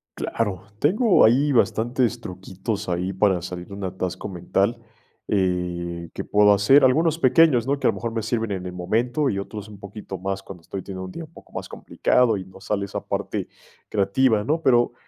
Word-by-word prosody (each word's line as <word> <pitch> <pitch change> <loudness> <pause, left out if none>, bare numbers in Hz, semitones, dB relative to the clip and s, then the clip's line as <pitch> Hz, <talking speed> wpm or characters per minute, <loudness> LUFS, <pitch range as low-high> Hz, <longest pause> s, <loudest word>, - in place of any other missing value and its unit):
Claro, 100 -5 -2 0.2
tengo 200 - +4
ahí 140 +6 +4
bastantes 120 0 +1
truquitos, 95 +1 -5
ahí 90 +2 -1
para 95 -1 +2
salir 90 -1 -6
de 100 - -11
un 100 - -7
atasco 95 0 -4
mental, 100 +5 -1 0.5
eh, 90 -3 -1
que - - -4
puedo 105 0 +5
hacer, 130 +8 +5
algunos 160 +5 +3
pequeños, 130 -3 +4
¿no? 140 - +1
Que - - -4
a - - +5
lo - - -8
mejor 115 - -4
me 115 -1 -2
sirven 115 0 -1
en 95 -2 -3
el 90 - -5
momento, 120 - 0
y 100 - -2
otros 105 +1 -6
un 100 -2 -12
poquito 100 -1 -8
más 95 +1 -3
cuando 90 -3 -11
estoy 95 +3 -6
teniendo 95 -1 -7
un 95 - -8
día 170 - -7
un 160 - -13
poco - - -16
más - - -6
complicado 120 -4 +1
y 95 - -7
no 95 0 -15
sale 100 0 -2
esa - - -4
parte - - -3 0.4
creativa, 105 +2 +2
¿no? 155 +7 0
Pero, 120 -3 +3
105 Hz, 200 wpm, -23 LUFS, 95-120 Hz, 0.5 s, puedo